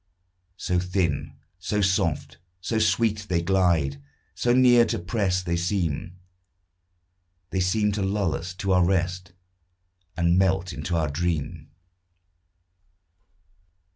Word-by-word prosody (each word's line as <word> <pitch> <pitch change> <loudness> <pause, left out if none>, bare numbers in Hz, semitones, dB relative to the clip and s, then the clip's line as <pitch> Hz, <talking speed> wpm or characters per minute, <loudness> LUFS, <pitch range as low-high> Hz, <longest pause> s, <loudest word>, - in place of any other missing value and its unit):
So 90 -1 0
thin, 90 -5 -2 0.2
so 95 +3 -2
soft, 95 -8 0 0.2
so 110 +5 -2
sweet 105 -2 +1
they 85 -2 0
glide, 85 -7 +1 0.3
So 120 - 0
near 125 -1 +6
to - - -2
press 90 0 -1
they 85 -1 -1
seem, 85 -1 -2 1.4
They 95 - -1
seem 105 +3 +1
to 100 0 -3
lull 95 -3 0
us 90 +2 -5
to 95 0 -2
our 90 -1 +4
rest, 90 -1 -1 0.8
And 85 +1 +3
melt 95 -2 +1
into 85 - -3
our 80 -2 +1
dream. 80 -1 -3
90 Hz, 115 wpm, -25 LUFS, 85-100 Hz, 1.4 s, near